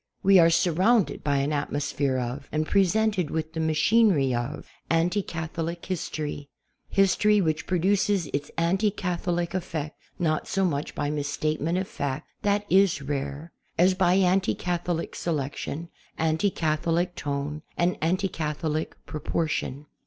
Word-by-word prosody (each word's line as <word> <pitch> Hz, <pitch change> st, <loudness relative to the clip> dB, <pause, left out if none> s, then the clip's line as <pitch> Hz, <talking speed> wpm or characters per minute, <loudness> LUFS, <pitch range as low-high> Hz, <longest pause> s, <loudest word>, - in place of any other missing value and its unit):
We 195 Hz, -1 st, +7 dB
are 165 Hz, -1 st, +7 dB
surrounded 175 Hz, -, +2 dB
by 145 Hz, -1 st, +1 dB
an 140 Hz, +2 st, 0 dB
atmosphere 145 Hz, -2 st, -1 dB
of, 125 Hz, +3 st, -4 dB
and 155 Hz, 0 st, 0 dB
pre 195 Hz, +4 st, +4 dB
sented 205 Hz, -3 st, +1 dB
with 160 Hz, 0 st, -3 dB
the 165 Hz, -, -3 dB
machinery 160 Hz, -, +3 dB
of, 120 Hz, +5 st, -3 dB, 0.2 s
anti 170 Hz, +5 st, +2 dB
Catholic 165 Hz, 0 st, -4 dB
history; 150 Hz, -5 st, -4 dB, 0.4 s
his 195 Hz, -2 st, +3 dB
tory 210 Hz, 0 st, +4 dB
which 160 Hz, -4 st, 0 dB
produces 190 Hz, +1 st, +2 dB
its 145 Hz, +1 st, -2 dB
anti 185 Hz, +5 st, +2 dB
Catholic 175 Hz, -2 st, -2 dB
effect 165 Hz, -5 st, -4 dB, 0.2 s
not 155 Hz, -3 st, 0 dB
so 195 Hz, 0 st, +1 dB
much 150 Hz, -4 st, -2 dB
by 145 Hz, 0 st, -1 dB
misstatement 155 Hz, +3 st, -1 dB
of 190 Hz, 0 st, -1 dB
fact— 140 Hz, +1 st, -4 dB
that 205 Hz, 0 st, +1 dB
is 195 Hz, -3 st, +4 dB
rare— 145 Hz, +3 st, -4 dB, 0.3 s
as 180 Hz, +2 st, +5 dB
by 185 Hz, -1 st, +3 dB
anti 190 Hz, 0 st, +3 dB
Catholic 175 Hz, -1 st, -2 dB
selection, 155 Hz, +1 st, -3 dB, 0.3 s
anti 160 Hz, +5 st, +2 dB
Catholic 170 Hz, +1 st, 0 dB
tone, 145 Hz, 0 st, -3 dB, 0.2 s
and 175 Hz, +1 st, +2 dB
anti 185 Hz, +4 st, +1 dB
Catholic 155 Hz, -1 st, -3 dB
proportion. 150 Hz, -2 st, -2 dB
165 Hz, 140 wpm, -26 LUFS, 150-185 Hz, 0.4 s, We